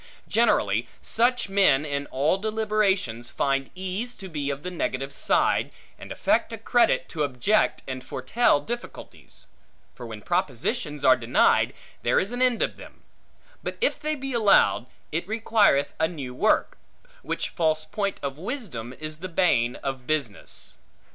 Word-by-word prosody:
Generally, - - +2
such 245 +1 +1
men 190 -8 +3
in 145 -1 -3
all 150 +8 +1
deliberations 210 - 0
find 135 +1 0
ease 190 +6 -4
to 190 - -9
be 145 -4 -3
of 140 0 -4
the 180 - -4
negative 135 -5 -3
side, - - +2 0.3
and - - -10
affect - - +1
a - - -5
credit - - +2
to 160 - -4
object 145 - +1
and 130 -1 -5
foretell 145 - +1
difficulties; 240 +10 -8 0.5
for 120 - -9
when 110 -2 -8
propositions 150 - -1
are 130 - +8
denied, 115 -1 +3 0.3
there - - +3
is 195 - -2
an 245 +1 -3
end 250 -3 +3
of - - -3
them; - - -14 0.6
but - - -5
if - - +1
they 305 0 -1
be 270 -2 -4
allowed, 210 - +4 0.2
it 170 +3 -2
requireth 215 -9 +2
a 160 - +3
new 140 -7 -6
work; - - +1 0.4
which - - -3
false 155 -2 0
point 200 +5 -2
of 140 +1 -4
wisdom 175 - -5
is 155 0 -6
the 185 +3 -6
bane 160 -10 +2
of 130 -2 -4
business. 140 -10 -3
160 Hz, 155 wpm, -25 LUFS, 135-215 Hz, 0.6 s, are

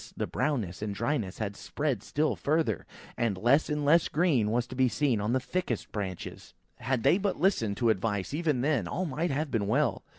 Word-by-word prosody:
the - - 0
brownness 110 - -2
and 105 -2 -3
dryness 115 -5 -1
had 100 -2 -3
spread 140 -5 -2
still 150 +7 0
further, 150 - 0 0.3
and 115 -5 0
less 125 +11 +3
and 150 -1 -1
less 165 +3 +5
of - - -17
green 150 -10 +2
was 120 +2 +1
to - - -10
be 130 0 +3
seen 120 -2 +1
on 105 +3 0
the 130 - +2
thickest 130 - -3
branches. 95 -4 -6 0.2
Had 125 -1 -1
they 180 - +4
but 200 -5 -1
listened 120 - +1
to 120 -3 +3
advice, 100 +1 -2
even 150 -5 0
then, 135 - +1
all 185 - -2
might 160 +3 -1
have 145 +1 -2
been 105 -4 0
well. 120 -2 +1
125 Hz, 205 wpm, -29 LUFS, 105-150 Hz, 0.3 s, less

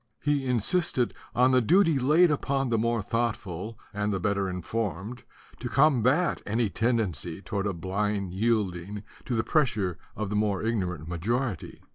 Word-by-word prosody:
He 145 -2 +1
insisted 125 - +1 0.2
on 125 +2 +5
the 130 0 +5
duty 165 - +4
laid 155 +6 +5
upon 135 -2 0
the 115 -2 +2
more 115 -1 0
thoughtful 110 -3 -2 0.2
and 105 0 -1
the 95 - -1
better 100 0 0
informed 105 +4 -4 0.4
to 120 - -4
com 135 -1 +4
bat 150 +10 +2
any 110 0 0
tendency 95 - -1
toward 100 0 -3
a 100 - -1
blind 95 +2 -2
yielding 100 -2 -1 0.2
to 125 - -1
the 110 - +1
pressure 105 - +1 0.2
of 105 -1 -3
the - - -1
more 105 -2 +1
ignorant 90 -8 -2
majority. 105 - -2
110 Hz, 155 wpm, -27 LUFS, 95-125 Hz, 0.4 s, on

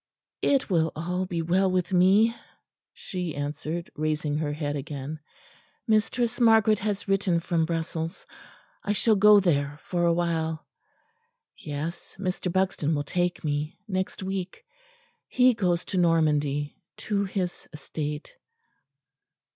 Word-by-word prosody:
"It 275 -2 +2
will 165 -4 +2
all 180 +3 -2
be 170 -3 -2
well 185 +3 +2
with 185 0 0
me," 200 +6 +5 0.6
she 180 -4 -5
answered, 150 +4 -4
raising 155 -1 -1
her 150 -2 -1
head 145 -1 -3
again. 145 +1 -5 0.7
"Mistress 230 +2 +1
Margaret 220 -2 +5
has 205 -1 -2
written 195 -3 +2
from 165 -1 0
Brussels. 165 +1 -3 0.6
I 205 - 0
shall 220 +2 +3
go 210 +1 +7
there 145 -6 +1
for 175 -1 0
a 170 - +4
while.... 165 -2 -1 0.9
Yes, 155 +3 -6
Mr. 185 -1 -2
Buxton 185 -4 +1
will 145 - -1
take 175 +4 -1
me; 150 0 -2
next 190 -1 -3
week: 190 - -4 0.6
he 255 0 +4
goes 180 -6 0
to 185 - -1
Normandy, 150 -4 +1 0.2
to 200 -1 -1
his 185 -2 -4
estate." 150 0 -5
175 Hz, 125 wpm, -26 LUFS, 155-195 Hz, 0.9 s, go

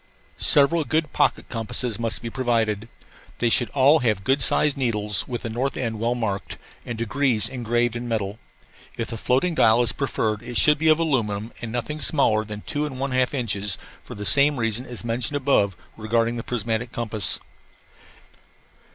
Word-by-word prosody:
Several 150 +3 +4
good 155 0 -1
pocket - - +1
compasses 115 0 -3
must 115 0 -2
be 115 - -3
provided. 115 -4 0 0.5
They 120 -1 +1
should 120 - +3
all 140 +3 +5
have 110 -7 0
good 135 +6 +2
sized 150 +1 +3
needles 105 -7 0
with 120 -2 -5
the 115 - -3
north 130 +4 -2
end 115 -4 -3
well 120 +2 0
marked 105 -5 -3 0.3
and 120 - -5
degrees 115 0 +1
engraved 120 -1 -1
in 120 +1 -4
metal. 105 -2 -2 0.6
If 115 - -3
the 115 - -5
floating 135 +11 +1
dial 115 -5 +4
is 115 - +2
preferred 110 -6 -1
it 120 0 -4
should 150 -1 +4
be 160 - +1
of 155 -1 +6
aluminum 115 -9 -1
and 120 -2 -5
nothing 150 +6 -4
smaller 110 -8 +2
than 105 -1 -7
two 150 +4 -2
and 130 -3 -8
one 135 0 -2
half 130 +2 +1
inches, 105 -6 -1 0.3
for - - -9
the 105 - -6
same 140 +3 +4
reason 115 +2 -1
as 120 -1 -8
mentioned 120 +4 -2
above 130 -9 +2 0.2
regarding 115 +2 0
the 115 - -3
prismatic 115 0 -2
compass. 110 -6 -2
120 Hz, 175 wpm, -24 LUFS, 110-135 Hz, 0.6 s, of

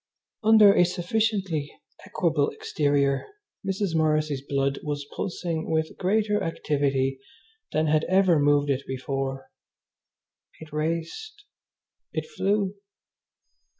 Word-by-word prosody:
Under 215 -2 +7
a 180 - +5
sufficiently 180 -3 -1 0.4
equable 165 -8 +1
exterior 140 -2 0 0.4
Mrs. 195 -2 -1
Morrissy's 155 -3 +1
blood 140 0 -1
was 145 -1 -4
pulsing 170 -3 -3
with 160 0 0
greater 210 +2 +1
activity 140 -4 0 0.5
than 155 +1 +1
had 155 0 +2
ever 185 -4 +4
moved 145 0 +3
it 135 0 0
before. 135 +1 -4 1.1
It 155 -1 -12
raced! 170 - -3 0.7
It - - -3
flew! 200 - 0
160 Hz, 100 wpm, -26 LUFS, 145-195 Hz, 1.1 s, Under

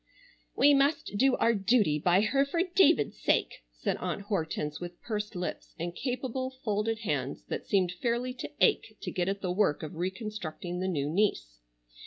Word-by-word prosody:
"We 290 +1 +6
must 280 -5 +2
do 260 +5 +4
our 230 - +3
duty 200 -7 +2
by 180 +5 +4
her 270 +6 +3
for 330 +5 0
David's 355 - +3
sake," - - +1
said - - -2
Aunt 200 - -3
Hortense, 160 -6 -2
with 175 0 -8
pursed 210 -2 -4
lips 180 0 -5
and 170 +1 -4
capable, 260 +1 -2
folded 215 +1 -1
hands 140 - -2
that - - -4
seemed 185 -3 +2
fairly 240 +1 0
to 250 - -6
ache 220 -1 +2
to - - -5
get 180 0 0
at 200 0 -3
the 185 - -1
work 180 -6 +1
of 155 - -6
reconstructing 180 -1 -4
the 185 - -1
new 145 -6 -1
niece. 150 - 0
200 Hz, 175 wpm, -29 LUFS, 175-240 Hz, -, We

